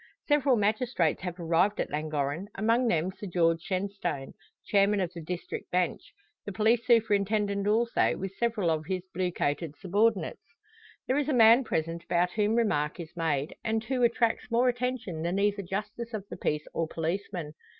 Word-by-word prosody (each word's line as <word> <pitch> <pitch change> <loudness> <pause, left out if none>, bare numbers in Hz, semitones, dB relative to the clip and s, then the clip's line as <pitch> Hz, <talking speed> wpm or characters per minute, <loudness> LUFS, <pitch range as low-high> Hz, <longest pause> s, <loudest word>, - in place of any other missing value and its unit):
Several 290 -3 +4
magistrates 210 - +1
have 180 -1 -5
arrived 175 +5 +2
at - - -2
Llangorren, 150 +3 -2
among 230 +4 +2
them 175 -3 +1
Sir 200 +2 -8
George 165 -2 +2
Shenstone, 185 -7 -3 0.3
chairman 200 0 +3
of 180 -2 -2
the 170 - -7
district 175 +2 -5
bench; 180 -1 0 0.4
the 205 - -5
police 220 +4 +2
superintendent 205 -3 +2
also, 230 +3 +2
with 195 0 -5
several 220 -7 +1
of 155 -1 -2
his 185 -1 -2
blue 180 0 -1
coated 150 -1 -2
subordinates. 205 +4 +1 0.6
There 265 +3 +1
is 295 - -1
a - - +2
man 230 +1 +7
present 165 -5 -2
about 175 +1 +1
whom 210 +2 +1
remark 150 -10 +1
is 165 -1 -8
made, 155 -4 -1
and 220 0 0
who 255 +2 -1
attracts 235 -1 +1
more 245 +2 +3
attention 245 -9 -3
than 170 +3 -1
either 205 0 +1
justice 210 +5 -5
of 200 -2 -6
the - - -7
peace 150 0 -2
or 165 - -1
policeman. 170 -1 -3
195 Hz, 170 wpm, -28 LUFS, 170-225 Hz, 0.6 s, man